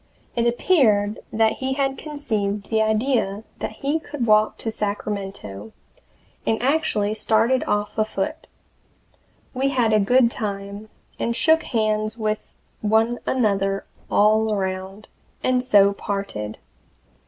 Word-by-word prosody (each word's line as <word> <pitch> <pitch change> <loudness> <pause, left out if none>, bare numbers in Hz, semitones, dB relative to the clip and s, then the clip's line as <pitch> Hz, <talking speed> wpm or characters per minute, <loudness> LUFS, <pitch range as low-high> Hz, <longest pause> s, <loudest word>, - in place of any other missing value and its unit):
It 235 -1 +2
appeared 225 - +3
that 220 0 +2
he 265 0 -1
had 270 0 0
conceived 215 -11 -3
the 220 0 +3
idea 220 -2 +1 0.2
that - - -2
he 290 +4 +1
could 295 -5 -4
walk 215 -1 +3
to 225 - -3
Sacramento, 200 - -4 0.7
and 220 - 0
actually 245 -7 +1
started 225 +4 +2
off 210 +1 -1
afoot. 215 +8 -2 1.1
We 270 +1 +1
had 240 -5 +2
a 215 - +5
good 240 +4 +4
time, 200 -1 -5 0.3
and 235 - -1
shook 320 +5 +4
hands 215 -1 -1
with 215 -1 -2 0.3
one 220 +3 +2
another 195 -5 +1 0.2
all 215 +1 +3
around, 190 0 -3 0.4
and 255 -1 +2
so 200 -5 +5
parted. 195 - -4
215 Hz, 120 wpm, -23 LUFS, 205-245 Hz, 1.1 s, a